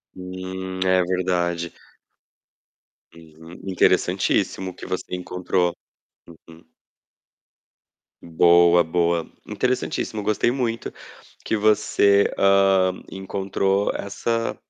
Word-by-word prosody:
Hum, 95 0 -7
é 95 0 +3
verdade. 85 -2 -1 1.4
Uhum, 80 +1 -14
interessantíssimo 95 0 +1
que - - -11
você 90 0 -5
encontrou. 90 0 -1 0.7
Uhum. 85 +1 -15 1.6
Boa, 85 +1 +5
boa. 85 0 0 0.2
Interessantíssimo, 125 -4 -2
gostei 110 +3 +1
muito 120 -3 -3 0.5
que 110 - -1
você, 100 -1 +3
hã, 95 -1 +4 0.2
encontrou 95 +1 -1
essa 115 +3 -2
95 Hz, 80 wpm, -22 LUFS, 85-100 Hz, 1.6 s, Boa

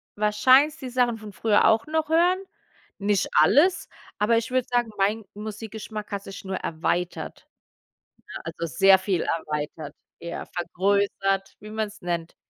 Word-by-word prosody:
wahrscheinlich 255 +9 +4
die 260 -5 -7
Sachen 245 -2 +1
von 215 -2 -10
früher 210 +1 +3
auch 220 +5 +3
noch 310 0 -1
hören, 345 +3 +4 0.6
nicht 200 -1 +1
alles, 315 - +4 0.3
aber 220 +3 +3
ich 230 +1 -2
würde 255 -1 +1
sagen, 240 -2 0
mein 210 +3 0
Musikgeschmack 215 0 -7
hat 200 -1 -4
sich 195 +1 -10
nur 190 0 -3
erweitert, 170 +2 -3 0.8
ne? - - -8
Also, 170 - -4
sehr 195 0 +7
viel 190 -3 -1
erweitert, 150 -1 -4 0.2
eher 170 0 -6
vergrößert, 195 +1 0
wie 210 - -11
man's 215 0 -4
nennt. 170 -2 -3
210 Hz, 145 wpm, -25 LUFS, 190-230 Hz, 0.8 s, sehr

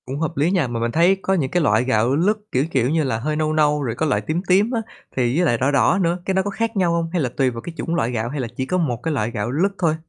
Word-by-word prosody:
Cũng 135 +3 -5
hợp 160 -1 -3
lý 150 +5 +2
nha, 175 -8 +1
mà 120 -1 -3
mình 115 0 -1
thấy 170 +7 +4
có 190 - 0
những 145 -8 0
cái 175 -2 +1
loại 110 -4 +3
gạo 125 +1 +1
lứt, 200 +8 +2
kiểu, 130 +3 +1
kiểu 130 -4 +1
như 160 +1 +1
là, 125 -5 -1
hơi 150 +5 -2
nâu 155 0 0
nâu, 150 -1 +2
rồi 115 -3 -2
có 160 - -1
loại 145 - +1
tím 160 +3 -2
tím 200 +5 +3
á, 230 -3 0 0.3
thì 125 -1 +1
với 175 - +3
lại 120 -7 +2
đỏ 130 +4 +1
đỏ 160 +6 +3
nữa, 170 0 +1
cái 190 - 0
nó 190 - +2
có 200 - -3
khác 225 +2 -2
nhau 180 -3 +2
hông? 165 -1 -1
Hay 175 - +1
là 130 - 0
tùy 135 -2 +3
vào 115 -2 -7
cái 170 - -8
chủng 170 - -2
loại 125 -7 0
gạo, 115 -1 -2
hay 145 +2 -4
là 125 - -2
chỉ 130 - -1
có 180 +7 -1
một 125 -9 -1
cái 160 - -1
loại 115 -4 -1
gạo 115 0 -3
lứt 175 +9 +1
thôi? 165 -4 +1
150 Hz, 335 wpm, -21 LUFS, 125-175 Hz, 0.3 s, thấy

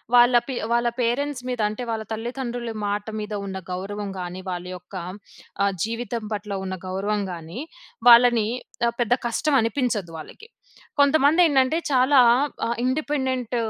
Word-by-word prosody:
వాళ్ళ 245 0 +6
పీ 260 - -3 0.2
వాళ్ళ 235 0 +2
పేరెంట్స్ 250 +3 0
మీద 250 -2 -3
అంటే 215 +4 -5
వాళ్ళ 220 -1 -2
తల్లిదండ్రుల 240 +1 -4
మాట 205 0 -2
మీద 210 0 -5
ఉన్న 190 -1 -5
గౌరవం 200 +3 -4
గాని, 180 +1 -5
వాళ్ళ 180 -1 -4
యొక్క 180 +2 -15 0.7
ఆహ్, 200 - +2
జీవితం 230 0 -3
పట్ల 210 0 -5
ఉన్న 190 0 -3
గౌరవం 200 +3 -1
గాని, 170 +5 -7 0.5
వాళ్ళని 235 -2 +7 0.4
ఆహ్, 235 - -2
పెద్ద 240 -1 +2
కష్టమనిపించదు 235 - 0
వాళ్ళకి. 295 - -11 0.5
కొంతమందేంటంటే 285 0 +4
చాలా 260 +2 +5 0.5
ఆహ్, 235 - -1
ఇండిపెండెంట్ 260 -3 -1
235 Hz, 130 wpm, -24 LUFS, 205-255 Hz, 0.7 s, వాళ్ళని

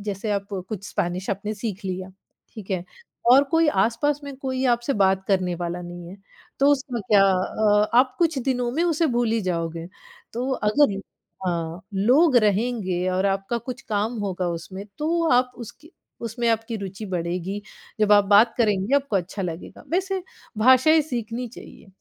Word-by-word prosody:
जैसे 205 +2 -3
आप 200 -1 -1 0.2
कुछ 205 -2 -6
स्पेनिश 180 +2 -2
आपने 205 +2 -3
सीख 210 -1 -5
लिया, 185 0 -4 0.5
ठीक 205 -3 -10
है 180 -2 -1 0.4
और 270 +3 +7
कोई 325 +3 +2
आस-पास 275 +8 +1
में 280 -1 -7
कोई 260 -1 -3
आपसे 240 +4 -3
बात 190 0 +3
करने 185 -2 +1
वाला 175 0 -4
नहीं 175 0 -9
है। 190 - -10 0.4
तो 275 - +4
उसमें 265 -4 -2
क्या 200 -2 +6
अ, 210 +3 +2
आप 255 +1 +4
कुछ 325 -5 +2
दिनों 250 -1 -1
में 320 +6 0
उसे 330 -1 +2
भूल 240 -2 +1
ही 230 - +1
जाओगे 165 -1 -3 0.5
तो 250 +3 -2
अगर 210 -2 +2 0.5
हाँ, 170 0 -2
लोग 255 - +4
रहेंगे 205 -4 +1
और 185 +1 +1
आपका 195 +4 -1
कुछ 245 +1 -7
काम 215 +3 -1
होगा 185 -3 -2
उसमें 185 +4 -6
तो 335 +2 0
आप 250 0 +3
उसकी 285 +7 -11 0.4
उसमें 230 +1 -2
आपकी 225 0 0
रुचि 195 +1 -7
बढ़ेगी, 180 +2 -3 0.4
जब 210 -1 +4
आप 205 -1 +6
बात 210 +3 +5
करेंगे 210 0 +1
आपको 275 -7 0
अच्छा 190 +2 -3
लगेगा, 170 -1 -7
वैसे 380 +2 -1 0.4
भाषाएँ 260 +7 +6
सीखनी 240 -3 -4
चाहिए। 225 - -13
215 Hz, 165 wpm, -24 LUFS, 190-255 Hz, 0.5 s, और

